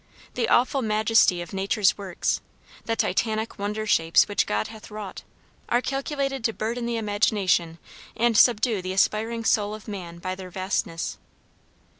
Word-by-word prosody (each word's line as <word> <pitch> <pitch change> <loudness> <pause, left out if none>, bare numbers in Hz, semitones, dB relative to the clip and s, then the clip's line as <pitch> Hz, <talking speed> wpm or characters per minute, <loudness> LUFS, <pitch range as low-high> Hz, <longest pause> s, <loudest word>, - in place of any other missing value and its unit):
The 460 - -1
awful 260 +2 +3
majesty 215 -5 +3
of 175 - -12
nature's 195 +1 +2
works, 190 -3 -2 0.4
the 225 - 0
Titanic 220 -1 -1
wonder 210 +2 -2
shapes 165 -5 +4
which 205 - 0
God 105 +1 0
hath 220 -1 -11
wrought, 210 -2 -7 0.5
are 240 - +3
calculated 275 0 -2
to 225 - +1
burden 235 +3 -3
the 235 -1 -1
imagination 205 -6 +1 0.4
and 235 0 +2
subdue 225 -2 +4
the 185 +1 -4
aspiring 225 +4 +1
soul 210 -1 +2
of 215 - -13
man 180 -5 -7
by 185 +2 -4
their 185 -1 -8
vastness. 185 -3 -3
215 Hz, 150 wpm, -25 LUFS, 190-230 Hz, 0.5 s, shapes